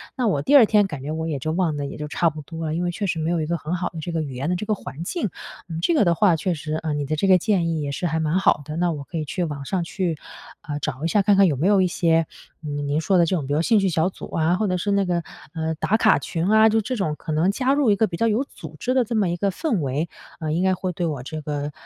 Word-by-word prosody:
那 250 Hz, -4 st, 0 dB
我 150 Hz, -9 st, +1 dB
第 285 Hz, -, +3 dB
2 260 Hz, -5 st, +9 dB
天 210 Hz, -2 st, +3 dB
感 150 Hz, -7 st, -7 dB
觉 145 Hz, -, -4 dB
我 160 Hz, +1 st, -3 dB
也 155 Hz, -3 st, -2 dB
就 155 Hz, +5 st, -2 dB
忘 165 Hz, -2 st, 0 dB
得 145 Hz, -1 st, -3 dB
也 140 Hz, -, -6 dB
就 150 Hz, -, -5 dB
差 165 Hz, +3 st, +1 dB
不 155 Hz, 0 st, -8 dB
多 165 Hz, +2 st, -6 dB
了， 155 Hz, -, -2 dB
因 175 Hz, -, -1 dB
为 175 Hz, -, 0 dB
确 200 Hz, +4 st, -3 dB
实 175 Hz, -4 st, -1 dB
没 160 Hz, +1 st, -1 dB
有 170 Hz, -2 st, 0 dB
一 -, -, -1 dB
个 170 Hz, +2 st, -1 dB
很 160 Hz, +3 st, -3 dB
好 180 Hz, 0 st, -2 dB
的 165 Hz, -, -8 dB
这 165 Hz, +3 st, -5 dB
个 165 Hz, -, 0 dB
语 140 Hz, -4 st, -5 dB
言 135 Hz, +5 st, -3 dB
的 180 Hz, -, +1 dB
这 180 Hz, -, -4 dB
个 215 Hz, -, +1 dB
环 160 Hz, -4 st, -8 dB
境， 220 Hz, -, -2 dB, 0.4 s
嗯， 165 Hz, -2 st, -5 dB
这 340 Hz, -, +2 dB
个 300 Hz, -, +4 dB
的 170 Hz, -1 st, +3 dB
话 185 Hz, -2 st, +4 dB
确 180 Hz, +3 st, -1 dB
实， 155 Hz, 0 st, -4 dB
呃， 160 Hz, -1 st, -2 dB
你 145 Hz, -1 st, -2 dB
的 155 Hz, +3 st, -1 dB
这 195 Hz, -, +1 dB
个 185 Hz, -1 st, +7 dB
建 180 Hz, -2 st, +1 dB
议 160 Hz, -2 st, -1 dB
也 145 Hz, -1 st, -3 dB
是 175 Hz, +5 st, -2 dB
还 160 Hz, 0 st, -1 dB
蛮 160 Hz, +3 st, +1 dB
好 190 Hz, -, +3 dB
的， 155 Hz, -, -6 dB
那 175 Hz, 0 st, +1 dB
我 145 Hz, -2 st, -6 dB
可 165 Hz, -, -7 dB
以 155 Hz, -, -2 dB
去 180 Hz, +5 st, -2 dB
网 145 Hz, -4 st, -4 dB
上 180 Hz, +4 st, -1 dB
去， 170 Hz, -1 st, -2 dB, 0.4 s
呃， 145 Hz, -1 st, -5 dB
找 135 Hz, 0 st, -4 dB
一 -, -, +2 dB
下， 205 Hz, -, +3 dB
看 200 Hz, +1 st, +4 dB
看 195 Hz, 0 st, +6 dB
有 150 Hz, -, +1 dB
没 160 Hz, +8 st, +1 dB
有 200 Hz, -1 st, +5 dB
一 185 Hz, -, +3 dB
些， 165 Hz, -2 st, +2 dB, 0.4 s
呃， 150 Hz, -, -5 dB
您 145 Hz, +1 st, -1 dB
说 185 Hz, +3 st, +2 dB
的 170 Hz, -, +5 dB
这 175 Hz, -, 0 dB
种 145 Hz, -1 st, 0 dB
兴 225 Hz, +4 st, +4 dB
趣 195 Hz, -1 st, +2 dB
小 160 Hz, 0 st, +1 dB
组 -, -, -10 dB
啊， 165 Hz, +2 st, +2 dB
或 215 Hz, +4 st, 0 dB
者 185 Hz, -1 st, 0 dB
是 205 Hz, +3 st, -1 dB
那 200 Hz, 0 st, +3 dB
个， 175 Hz, -1 st, 0 dB, 0.3 s
呃， 160 Hz, -1 st, -2 dB
打 205 Hz, +7 st, +1 dB
卡 -, -, +4 dB
群 165 Hz, -1 st, -3 dB
啊， 220 Hz, +1 st, +6 dB
就 220 Hz, +1 st, +2 dB
这 255 Hz, +5 st, -3 dB
种 190 Hz, -9 st, -1 dB
可 160 Hz, -, -6 dB
能 165 Hz, +5 st, +2 dB
加 260 Hz, +5 st, +1 dB
入 280 Hz, -6 st, +3 dB
一 -, -, +4 dB
个 220 Hz, -, +3 dB
比 170 Hz, -, -5 dB
较 230 Hz, -, +1 dB
有 225 Hz, +4 st, +1 dB
组 160 Hz, -, -11 dB
织 255 Hz, -, 0 dB
的 260 Hz, -1 st, +3 dB
这 235 Hz, +1 st, -4 dB
么 210 Hz, -4 st, +2 dB
一 170 Hz, -, -1 dB
个 200 Hz, +3 st, 0 dB
氛 230 Hz, -, -1 dB
围， 140 Hz, +4 st, -1 dB, 0.3 s
呃， 155 Hz, -1 st, -2 dB
应 170 Hz, +3 st, 0 dB
该 190 Hz, 0 st, +3 dB
会 185 Hz, 0 st, -3 dB
对 175 Hz, +1 st, -2 dB
我 150 Hz, -6 st, -3 dB
这 155 Hz, +4 st, -6 dB
个， 145 Hz, 0 st, -3 dB
170 Hz, 345 characters per minute, -23 LUFS, 155-195 Hz, 0.4 s, 2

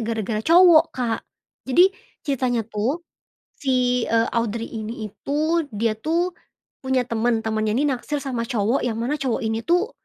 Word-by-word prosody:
gara-gara 220 Hz, -1 st, -2 dB
cowok, 335 Hz, +3 st, +7 dB
Kak. 235 Hz, -3 st, -1 dB, 0.5 s
Jadi 360 Hz, +9 st, +5 dB, 0.3 s
ceritanya 250 Hz, -5 st, 0 dB
tuh 230 Hz, +10 st, -2 dB, 0.5 s
si, 250 Hz, -3 st, +1 dB
e 230 Hz, -, +1 dB
Audrey 230 Hz, 0 st, -2 dB
ini 220 Hz, -1 st, -5 dB
itu 310 Hz, +7 st, -1 dB
dia 215 Hz, 0 st, 0 dB
tuh 335 Hz, +7 st, 0 dB, 0.5 s
punya 260 Hz, -1 st, 0 dB
teman 230 Hz, -1 st, 0 dB
temannya 215 Hz, -1 st, -1 dB
ini 275 Hz, -, +1 dB
naksir 275 Hz, +3 st, -3 dB
sama 245 Hz, -4 st, -3 dB
cowok 230 Hz, +1 st, 0 dB
yang 235 Hz, -, -1 dB
mana 240 Hz, +7 st, -2 dB
cowok 260 Hz, -5 st, -1 dB
ini 225 Hz, +1 st, -2 dB
tuh, 355 Hz, +7 st, +2 dB
245 Hz, 150 wpm, -23 LUFS, 225-290 Hz, 0.5 s, cowok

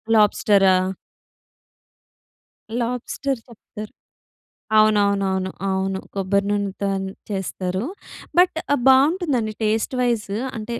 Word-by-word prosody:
లాబ్స్టరా? 200 Hz, -2 st, +4 dB, 2.1 s
Lobster 250 Hz, +2 st, -2 dB
చెప్తారు, 215 Hz, -2 st, -10 dB, 0.9 s
అవునవునవును. 200 Hz, -3 st, +2 dB, 0.2 s
అవును. 190 Hz, 0 st, -1 dB
కొబ్బరి 200 Hz, 0 st, 0 dB
నూనెతోని 195 Hz, -1 st, -2 dB, 0.2 s
చేస్తారు. 190 Hz, 0 st, -3 dB, 0.5 s
బట్, 360 Hz, -1 st, +5 dB, 0.2 s
ఆహ్, 285 Hz, -, -1 dB
బాగుంటుందండి 270 Hz, -, +2 dB
టేస్ట్ 220 Hz, +4 st, 0 dB
వైస్ 235 Hz, -4 st, 0 dB, 0.3 s
అంటే 225 Hz, +2 st, -5 dB
210 Hz, 80 wpm, -22 LUFS, 195-235 Hz, 2.1 s, బట్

